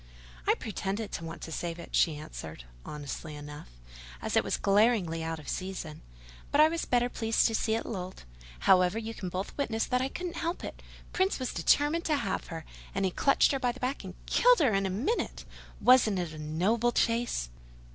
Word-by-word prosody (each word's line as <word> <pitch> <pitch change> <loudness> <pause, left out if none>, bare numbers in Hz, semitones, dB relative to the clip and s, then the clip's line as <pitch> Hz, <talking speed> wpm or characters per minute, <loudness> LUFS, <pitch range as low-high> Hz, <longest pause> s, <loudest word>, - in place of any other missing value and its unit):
"I - - +5
pretended 205 0 -4
to - - -4
want 165 +1 -7
to 165 - -6
save 170 +1 -3
it," 170 - -6
she 160 -4 +3
answered, 80 - -8 0.2
honestly 150 +1 -6
enough, 145 - -9 0.5
"as - - -3
it - - +5
was - - 0
so - - -8
glaringly 200 -5 +3
out 165 0 -3
of 155 - -12
season; 185 -5 -4 0.5
but 285 - +2
I 310 +1 +8
was 335 0 -2
better 245 0 +2
pleased 225 -2 +1
to 225 - +2
see 220 0 +1
it 225 - -2
lolled. 185 -3 -6 0.4
However, 185 +2 +5
you 225 0 -4
can 185 -4 -5
both 185 +2 -4
witness 225 -5 0
that 250 0 +1
I 265 - 0
couldn't 355 +3 -5
help 340 +1 -2
it: - - -7 0.3
Prince 375 +1 +2
was 255 -2 -3
determined 300 +4 +2
to 310 - +2
have 280 - -2
her; 165 -1 -7 0.3
and 195 0 +1
he 185 - +1
clutched 275 +9 +4
her 275 - 0
by 250 -2 +1
the 260 - -12
back, 255 +3 -2
and - - -8
killed - - +5
her 265 - +3
in 195 0 +2
a - - -2
minute! 245 - -2 0.3
Wasn't 240 -5 +5
it 175 -3 -3
a 155 - -8
noble 190 +11 +1
chase?" 230 - +1
210 Hz, 205 wpm, -30 LUFS, 165-250 Hz, 0.5 s, I